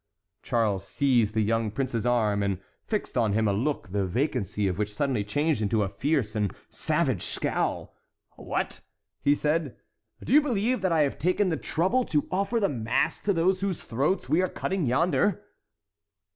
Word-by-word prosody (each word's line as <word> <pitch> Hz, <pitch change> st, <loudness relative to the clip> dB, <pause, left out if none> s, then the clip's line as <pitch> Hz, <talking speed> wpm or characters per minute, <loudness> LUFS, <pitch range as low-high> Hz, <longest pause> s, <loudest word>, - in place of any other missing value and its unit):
Charles 105 Hz, -5 st, 0 dB
seized 120 Hz, -6 st, +2 dB
the 110 Hz, -, +3 dB
young 115 Hz, +1 st, +1 dB
prince's 125 Hz, 0 st, -2 dB
arm, 110 Hz, -4 st, +2 dB
and 100 Hz, -2 st, -1 dB, 0.3 s
fixed 210 Hz, -, -2 dB
on 110 Hz, -4 st, +2 dB
him 110 Hz, +1 st, +2 dB
a 100 Hz, -, +2 dB
look 125 Hz, +1 st, -1 dB
the 100 Hz, +1 st, 0 dB
vacancy 110 Hz, -, -1 dB
of 95 Hz, +1 st, -2 dB
which 105 Hz, 0 st, -1 dB
suddenly 130 Hz, -4 st, 0 dB
changed 145 Hz, +5 st, 0 dB
into 105 Hz, 0 st, +1 dB
a 95 Hz, -, -2 dB
fierce 135 Hz, -4 st, -1 dB
and 105 Hz, -4 st, 0 dB, 0.2 s
savage -, -, 0 dB
scowl. -, -, -2 dB, 0.4 s
"What!" -, -, -3 dB, 0.4 s
he 145 Hz, -, +4 dB
said, 150 Hz, -4 st, -1 dB, 0.5 s
"do -, -, -1 dB
you 300 Hz, -, +8 dB
believe 245 Hz, -4 st, 0 dB
that 185 Hz, -2 st, +1 dB
I 160 Hz, -2 st, +3 dB
have 140 Hz, -2 st, 0 dB
taken 185 Hz, +4 st, +2 dB
the 165 Hz, -, 0 dB
trouble 190 Hz, +12 st, +1 dB
to 150 Hz, -3 st, 0 dB
offer 200 Hz, +5 st, 0 dB
the 200 Hz, -, +2 dB
mass 115 Hz, -, 0 dB
to 205 Hz, -, 0 dB
those 185 Hz, +1 st, +2 dB
whose 195 Hz, -4 st, -2 dB
throats 140 Hz, +11 st, 0 dB
we 165 Hz, -, +3 dB
are 185 Hz, -, 0 dB
cutting 185 Hz, -6 st, -2 dB
yonder?" 180 Hz, +9 st, +2 dB
135 Hz, 175 wpm, -27 LUFS, 110-180 Hz, 0.5 s, you